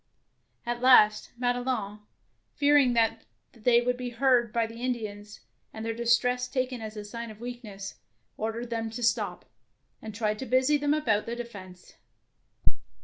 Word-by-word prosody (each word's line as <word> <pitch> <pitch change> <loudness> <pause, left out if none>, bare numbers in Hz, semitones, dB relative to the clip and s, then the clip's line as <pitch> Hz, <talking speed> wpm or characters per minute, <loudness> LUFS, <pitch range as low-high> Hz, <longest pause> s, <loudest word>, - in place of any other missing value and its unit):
At 240 0 -3
last 215 -5 +6
Madelon, 245 -4 -1 0.6
fear 290 0 +4
ing 265 -4 +5
that 225 -1 +2 0.3
they 235 0 +3
would 250 0 0
be 250 -1 -4
heard 240 -1 +2
by 230 0 +1
the 230 +1 -9
Indians, 210 -4 -4 0.3
and 220 0 -7
their 225 - -1
distress 245 +2 +2
taken 255 -2 -2
as 215 -1 -7
a 210 - -6
sign 230 +2 -6
of 215 -1 -11
weakness, 225 -5 -7 0.4
ordered 230 +2 -4
them 225 -1 -2
to 235 +2 -6
stop, 225 -2 0 0.6
and 215 -1 -8
tried 215 -1 -1
to 265 - -5
busy 260 +4 +3
them 290 +1 +1
about 220 -9 +1
the 235 - -3
defence. 200 -7 -10
235 Hz, 155 wpm, -28 LUFS, 220-250 Hz, 0.6 s, last